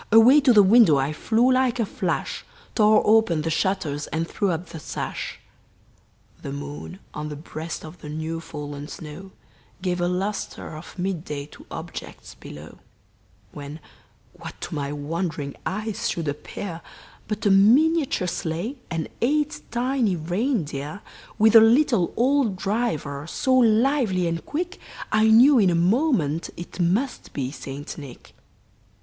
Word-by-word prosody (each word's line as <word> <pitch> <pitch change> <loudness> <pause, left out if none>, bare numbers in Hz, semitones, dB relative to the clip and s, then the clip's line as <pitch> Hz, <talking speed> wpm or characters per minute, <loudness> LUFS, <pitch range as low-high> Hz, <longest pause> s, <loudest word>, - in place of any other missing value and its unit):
Away 240 +7 +7
to 270 -3 +5
the 210 -3 +7
window 195 -6 +6
I 135 +3 0
flew 230 +10 +2
like 255 -1 +1
a 230 - +2
flash, - - -3 0.3
Tore 215 -1 +5
open 210 -8 +3
the 165 - -1
shutters 155 -5 -1
and 165 +1 -2
threw 200 +2 -1
up 170 0 -3
the 165 - -8
sash; - - -5 1.0
The - - -6
moon 75 +4 -7 0.2
on 150 0 -5
the 150 - -6
breast 160 +2 -7
of 160 +2 -11
the 150 - -8
new 160 +2 -4
fallen 145 -2 -7
snow 160 +5 -9 0.5
Gave 180 -1 -1
a 175 - +2
luster 185 -2 -3
of 155 +4 -11
mid 180 -3 -2
day 145 -3 -5
to - - -15
objects - - -8
below; 75 +1 -11 0.7
When, 145 +2 -8 0.5
what - - -10
to - - -5
my 145 -2 -3
wondering 150 -1 -3
eyes 215 +2 -2
should 165 -2 -3
appear, 165 +4 -5 0.5
But 210 +1 -4
a 200 - +5
miniature 265 - +4
sleigh 175 - -3
and 165 -2 -3
eight 295 +3 +1
tiny 240 -4 0
reindeer, 175 - -2 0.4
With 220 +1 +5
a 225 - +11
little 230 - +4
old 255 -4 +2
driver, 170 -8 -2
so 260 +9 0
lively 230 -5 +3
and 165 0 -2
quick, 355 +5 -4 0.3
I 215 0 +4
knew 245 +5 +7
in 195 -4 +4
a 175 - +2
moment 175 - +1
it 175 +2 -9
must 200 +10 0
be 130 -2 -3
St. 140 +2 -7
Nick. 140 -4 -12
185 Hz, 150 wpm, -24 LUFS, 155-230 Hz, 1.0 s, a